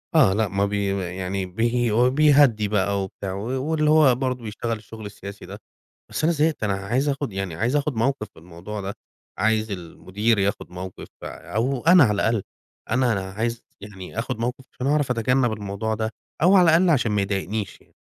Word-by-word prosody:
آه، 95 - +6
لأ، 110 +2 +1
ما 100 +1 0
بي 100 0 -1 0.3
يعني 95 +1 -2
بي 115 +5 0 0.2
بيهدي 140 -6 +4
بقى 100 -1 0
وبتاع 95 0 -6
و 120 +7 -3
واللي 155 0 +1
هو 155 -5 +6
برضه 125 -1 -2
بيشتغل 115 +2 -3
الشغل 110 0 -11
السياسي 100 0 -9
ده، - - -10 0.5
بس - - -3
أنا 170 - +4
زهقت 155 -5 0
أنا 105 - +1
عايز 120 +9 -1
آخد 140 -4 -2
يعني 95 -3 -3
عايز 120 - 0
آخد 145 -3 -1
موقف 115 0 0
في - - -17
الموضوع 90 +5 -8
ده، 100 +1 -5 0.4
عايز 110 +2 +1
المدير 100 +4 -1
ياخد 100 -2 -1
موقف، 90 +1 -8 0.2
أو 125 +4 -2
أنا 180 -4 +8
على 105 - +2
الأقل 110 0 +1 0.5
أنا 125 0 +2
أنا 95 -2 -3
عايز 115 +3 -3 0.2
يعني 100 0 -9
آخد 115 - -2
موقف، 125 +3 -3
عشان 125 - -5
أعرف 145 -2 +1
أتجنب 125 +1 +2
الموضوع 105 +1 -3
ده، 110 0 -2 0.3
أو 190 +3 +6
على 180 - +7
الأقل 170 +3 +4
عشان 120 -8 +2
ما 105 - +2
يضايقنيش 100 +1 -3
يعني. - - -27
110 Hz, 185 wpm, -23 LUFS, 100-130 Hz, 0.5 s, أنا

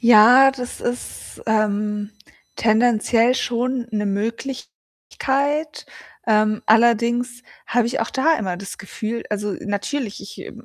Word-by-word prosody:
Ja, 245 +3 +7
das 250 -2 -7
ist, 245 0 -6
ähm, 210 -1 0 0.4
tendenziell 230 +1 +3
schon 245 0 -1
'ne 210 -1 -1
Möglichkeit. 270 +6 -3 0.4
Ähm, 215 -1 +2
allerdings 235 +2 +2 0.2
habe 240 -1 +1
ich 255 - -3
auch - - -2
da 315 +4 +2
immer 185 -5 -3
das 195 +1 -8
Gefühl 220 +3 -5
also, 210 -1 -2
natürlich, 205 +3 -3
ich - - -10
m 235 +1 -12
230 Hz, 120 wpm, -21 LUFS, 210-250 Hz, 0.4 s, Ja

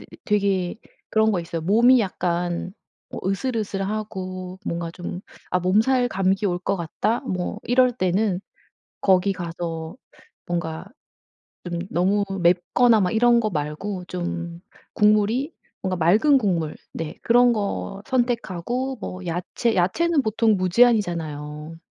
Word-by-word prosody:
이 - - -14
되게 200 -3 +1 0.3
그런 220 0 +3
거 180 - 0
있어요. 165 -1 -5
몸이 235 +7 +5
약간 175 -2 -2 0.4
어 - - -6
으슬으슬하고 195 -4 -3
뭔가 170 0 -3
좀 175 +1 -6 0.3
'아 180 - +2
몸살 225 +8 +3
감기 195 -1 0
올 175 -1 0
것 190 +2 -1
같다.' 185 +7 -1
뭐 185 -4 -3
이럴 250 0 +3
때는 190 -2 0 0.6
거기 190 0 +3
가서 165 -2 -5 0.5
뭔가 170 0 -3 0.8
좀 175 -1 -3
너무 195 +4 +2 0.2
맵거나 195 +7 +4
막 180 -1 +1
이런 235 +1 +4
거 215 - 0
말고 165 +5 -4
좀 175 -1 -4 0.3
국물이 215 +8 +3 0.3
뭔가 185 -1 -2
맑은 210 - +4
국물 170 -8 -1 0.2
네 160 -2 -5
그런 245 +1 +5
거 200 -1 -3
선택하고 245 0 -1
뭐 185 0 -6
야채, 180 +7 -1
야채는 295 - +2
보통 220 -1 +2
무제한이잖아요. 170 -7 +1
190 Hz, 240 characters per minute, -23 LUFS, 175-220 Hz, 0.8 s, 몸이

